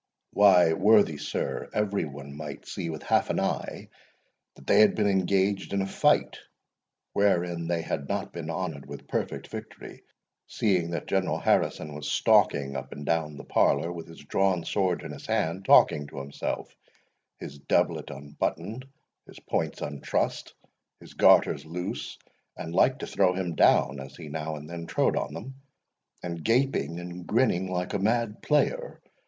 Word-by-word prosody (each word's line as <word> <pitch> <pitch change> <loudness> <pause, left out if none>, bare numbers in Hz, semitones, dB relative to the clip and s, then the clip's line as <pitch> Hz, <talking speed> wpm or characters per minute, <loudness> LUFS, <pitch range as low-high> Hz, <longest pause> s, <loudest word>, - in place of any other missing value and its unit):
"Why, 90 -5 +6
worthy 105 -4 +4
sir, 75 - -3
every 100 -4 0
one 70 -1 -9
might 75 -2 -8
see 85 - -5
with 80 -2 -6
half - - +2
an - - 0
eye - - -3 0.7
that 70 - -16
they 100 - +4
had 105 - +6
been 105 - +1
engaged 95 0 +1
in 100 - +1
a - - -2
fight 95 - +2 0.7
wherein 85 -4 +1
they 85 -1 -1
had 70 -3 -4
not - - -3
been 85 -2 -6
honoured 80 -5 -4
with 70 0 -9
perfect - - -3
victory; - - -9 0.5
seeing 90 -6 +1
that 85 - -4
General 95 -1 0
Harrison 75 -1 0
was 75 0 -5
stalking 70 -1 +3
up - - -6
and 75 - -8
down 75 -2 -1
the - - -9
parlour, 75 +5 +2
with 85 -2 -7
his 80 - -13
drawn 90 +3 0
sword 95 -3 0
in 80 - -6
his 75 - -10
hand, 90 +4 -1
talking 75 -1 +5
to 70 - -12
himself, 70 +1 -5 0.6
his 70 - -9
doublet - - 0
unbuttoned, 85 - -4 0.4
his - - -13
points - - -2
untrussed, 70 -1 -2 0.4
his - - -14
garters - - +5
loose, 90 +3 -5 0.4
and 80 - -6
like 130 +8 +4
to - - -5
throw 90 -2 +2
him 90 -3 -2
down 70 -3 +3
as 65 0 -9
he 80 -3 -9
now 80 +1 -4
and 75 0 -9
then 85 0 -7
trode - - +1
on 75 - -3
them, 120 +11 -7 0.7
and 85 -2 -5
gaping 115 - +1
and 90 0 -8
grinning 105 -6 +1
like 90 +2 -2
a 100 - 0
mad 110 +1 0
player. - - 0
85 Hz, 165 wpm, -27 LUFS, 75-100 Hz, 0.7 s, Why